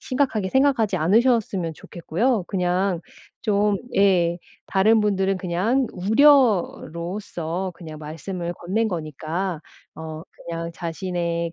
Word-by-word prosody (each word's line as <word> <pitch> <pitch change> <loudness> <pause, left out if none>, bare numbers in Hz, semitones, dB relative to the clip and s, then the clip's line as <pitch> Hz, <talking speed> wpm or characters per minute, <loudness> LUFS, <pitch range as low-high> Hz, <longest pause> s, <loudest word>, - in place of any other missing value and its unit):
심각하게 255 -7 0
생각하지 265 -8 +3
않으셨으면 195 -1 +2
좋겠고요. 190 +8 -1
그냥 180 -1 0 0.4
좀 205 -1 +2 0.2
예. 175 -4 +3 0.3
다른 215 +3 +4
분들은 195 -2 +1
그냥 195 +9 +1
우려로써 190 - +2
그냥 160 -3 -9
말씀을 170 +3 -5
건넨 215 +7 -1
거니까 165 +1 -3 0.3
어 160 0 -7
그냥 165 0 -6
자신의 170 -1 -3
185 Hz, 250 characters per minute, -23 LUFS, 170-210 Hz, 0.4 s, 다른